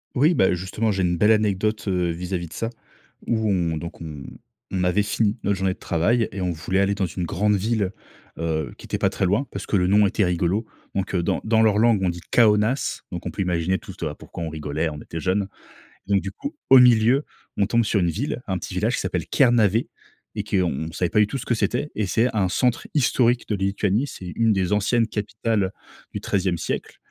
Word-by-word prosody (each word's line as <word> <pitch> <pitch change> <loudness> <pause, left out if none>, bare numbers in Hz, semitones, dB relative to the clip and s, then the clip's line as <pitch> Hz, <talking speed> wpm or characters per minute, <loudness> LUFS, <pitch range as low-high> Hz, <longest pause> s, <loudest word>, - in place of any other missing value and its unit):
Oui, 150 +7 +4
bah, 95 - +3
justement, 95 +5 -1
j'ai 95 -2 0
une 90 -1 +1
belle 105 +6 +4
anecdote, 105 0 +1
heu, 90 -2 +1
vis-à-vis 90 0 -4
de - - -13
ça. 115 - -3 0.6
Où 110 -2 0
on 85 -4 0
donc 85 +2 -7
on 75 -4 -7 0.5
on 95 -1 -1
avait 90 +3 +2
fini 105 +2 0
notre 100 0 +1
journée 95 -1 0
de - - -19
travail 110 +8 +1
et 95 - -4
on 90 -1 0
voulait 85 +4 -1
aller 100 +1 +2
dans 100 -2 0
une 90 +1 -4
grande 105 +5 +1
ville, 105 -1 0 0.5
heu, 80 -2 -2
qui - - -12
était - - -2
pas - - +2
très - - -3
loin 105 +9 +1
parce - - -6
que - - -1
le 90 -1 +2
nom 105 +2 +5
était 100 +1 +1
rigolo. 90 +5 0 0.3
Donc 95 0 -2
heu, 85 - +1
dans - - 0
dans 110 0 +3
leur 110 -2 +4
langue, 110 -2 +4
on 90 - +2
dit: 85 0 -4
«Caonas», 110 +3 +3
donc - - -6
on - - -3
peut - - -4
imaginer 90 0 0
toute 95 - -10
pourquoi 85 - -8
on 80 - -3
rigolait, 75 +1 -2
on 75 - -7
était 80 - -6
jeune. 95 +1 0 0.6
Donc 100 -1 +2
du 100 - -5
coup, 280 +2 -6 0.2
au 135 - +10
milieu, 125 +3 +5 0.3
on 100 - +2
tombe 115 +3 +2
sur 105 -1 +1
une 85 -2 +2
ville, 125 - -3
un 95 -2 -1
petit - - -7
village - - 0
qui - - -2
s'appelle - - -2
Kernavė 115 -4 +3 0.5
et - - -1
qu'on 80 -4 -1
savait 90 +1 0
pas 105 - +3
du 105 - +5
tout 135 - -3
ce - - -8
que 120 - +2
c'était 145 +6 -1
et 105 -2 -1
c'est 115 +6 +2
un 95 -4 +2
centre 125 +4 +1
historique 125 -3 +2
de 105 - 0
Lituanie. 100 +5 0
C'est 90 -9 -8
1 115 -1 +3
des 95 -1 0
anciennes 115 +3 +2
capitales 105 -2 -1 0.4
du - - -4
XIIe 95 -3 0
siècle. - - -4
100 Hz, 225 wpm, -23 LUFS, 90-110 Hz, 0.6 s, au